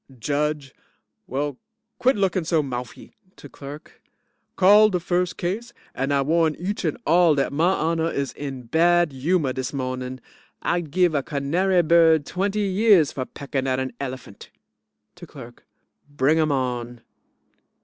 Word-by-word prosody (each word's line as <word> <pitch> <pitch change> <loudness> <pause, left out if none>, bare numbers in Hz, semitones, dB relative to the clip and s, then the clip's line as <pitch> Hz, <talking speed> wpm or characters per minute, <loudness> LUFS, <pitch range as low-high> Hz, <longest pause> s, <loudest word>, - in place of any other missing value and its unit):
JUDGE 145 +2 -2 0.5
Well, 140 0 -3 0.4
quit 260 +2 +3
looking 190 -3 0
so 160 -1 +1
moufy. 125 -3 -7 0.2
(to - - -12
CLERK) 145 +2 -11 0.5
Call 205 +3 +6
de 180 -3 -1
first 180 +1 -1
case. 220 +7 -4 0.2
And 135 +2 -2
I 140 -1 +2
warn 160 +1 +1
each 195 +4 -4
and 160 -4 -1
all 170 -1 +4
dat 140 0 -1
my 165 +5 +2
honor 165 -1 0
is 140 -4 -3
in 135 -3 -7
bad 170 +5 +2
humor 140 +1 0
dis 130 0 -4
mawnin'. 130 -1 -4 0.4
I'd 175 -3 -1
give 180 +1 +2
a 140 - +1
canary 170 +7 0
bird 160 -2 +4
twenty 200 +3 -2
years 195 -5 +3
for 130 - -4
peckin' 135 -1 -4
at 130 0 0
a 130 -1 -3
elephant. 130 -2 -8 0.7
(to - - -11
CLERK) - - -13 0.5
Bring 145 +4 +2
'em 155 -1 +2
on. 120 -3 -3
155 Hz, 150 wpm, -23 LUFS, 135-175 Hz, 0.7 s, Call